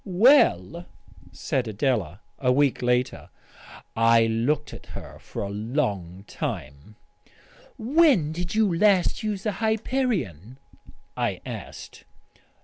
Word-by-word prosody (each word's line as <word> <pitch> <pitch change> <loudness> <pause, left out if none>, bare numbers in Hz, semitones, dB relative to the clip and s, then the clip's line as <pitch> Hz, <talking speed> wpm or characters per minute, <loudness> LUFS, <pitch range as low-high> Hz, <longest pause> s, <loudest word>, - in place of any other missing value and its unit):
"Well?" 180 - +3 0.4
said 125 -3 -2
Adela 105 - -1 0.2
a 125 -2 +2
week 140 0 +2
later. 125 0 0 0.7
I 115 0 +4
looked 125 +7 -1
at - - -11
her - - -10
for - - -6
a 100 - -4
long 100 - -3
time. 70 +3 -6 0.8
"When 250 - +3
did 175 +3 -4
you 210 -5 +2
last 195 +2 +3
use 210 -3 -3
the 215 - 0
Hyperion?" 220 - -1 0.6
I - - -1
asked. - - -9
135 Hz, 110 wpm, -25 LUFS, -, 0.8 s, I